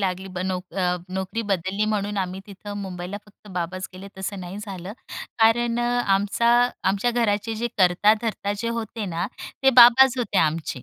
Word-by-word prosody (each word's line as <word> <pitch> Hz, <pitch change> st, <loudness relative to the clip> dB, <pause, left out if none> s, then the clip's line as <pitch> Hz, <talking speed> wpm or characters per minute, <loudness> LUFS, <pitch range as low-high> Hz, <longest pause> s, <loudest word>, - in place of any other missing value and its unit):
लागली 190 Hz, 0 st, -2 dB
ब -, -, -4 dB
नोक 180 Hz, -2 st, -4 dB
अ, 180 Hz, -2 st, +1 dB
नोकरी 190 Hz, +4 st, -3 dB
बदलली 195 Hz, +1 st, -1 dB
म्हणून 205 Hz, -1 st, -1 dB
आम्ही 185 Hz, 0 st, -3 dB
तिथं 205 Hz, 0 st, -8 dB
मुंबईला 180 Hz, 0 st, -6 dB
फक्त 210 Hz, 0 st, -19 dB
बाबाच 185 Hz, +1 st, -4 dB
गेले 190 Hz, +2 st, -10 dB
तसं 190 Hz, 0 st, -4 dB
नाही 180 Hz, +2 st, -7 dB
झालं, 195 Hz, -2 st, -7 dB, 0.5 s
कारण 230 Hz, +1 st, +3 dB
अ, -, -, +1 dB, 0.3 s
आमचा 205 Hz, +4 st, +1 dB, 0.3 s
आमच्या 200 Hz, +5 st, +1 dB
घराचे 225 Hz, -2 st, 0 dB
जे 235 Hz, +2 st, -2 dB
करता-धरता 205 Hz, +3 st, +2 dB
जे 230 Hz, -, -2 dB
होते 230 Hz, -1 st, -4 dB
ना, 170 Hz, -1 st, -2 dB, 0.4 s
ते 270 Hz, -, +6 dB
बाबाच 245 Hz, +1 st, +8 dB
होते 205 Hz, -5 st, 0 dB
आमचे, 155 Hz, -4 st, 0 dB
200 Hz, 165 wpm, -24 LUFS, 185-225 Hz, 0.5 s, बाबाच